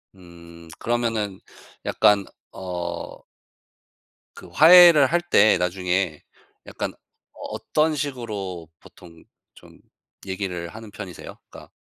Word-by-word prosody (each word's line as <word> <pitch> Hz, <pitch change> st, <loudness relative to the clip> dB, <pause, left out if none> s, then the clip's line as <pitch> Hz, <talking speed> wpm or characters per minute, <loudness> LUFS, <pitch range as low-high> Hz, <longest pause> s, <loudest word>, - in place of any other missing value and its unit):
음 85 Hz, -2 st, -15 dB
그러면은 115 Hz, -5 st, -2 dB, 0.5 s
약간 100 Hz, -2 st, +3 dB, 0.3 s
어 90 Hz, -2 st, -6 dB, 1.2 s
그 -, -, -13 dB
화해를 165 Hz, -3 st, +7 dB
할 175 Hz, +5 st, 0 dB
때 110 Hz, -, +4 dB
나중에 90 Hz, -2 st, -2 dB, 0.4 s
약간 -, -, -5 dB, 0.6 s
어떤 155 Hz, 0 st, -1 dB
식으로 105 Hz, -, -5 dB
보통 85 Hz, -2 st, -17 dB, 0.3 s
좀 -, -, -18 dB, 0.5 s
얘기를 95 Hz, -3 st, -5 dB
하는 110 Hz, +2 st, -12 dB
편이세요? 95 Hz, -4 st, -10 dB
그러니까 -, -, -14 dB
100 Hz, 205 characters per minute, -23 LUFS, 90-120 Hz, 1.2 s, 화해를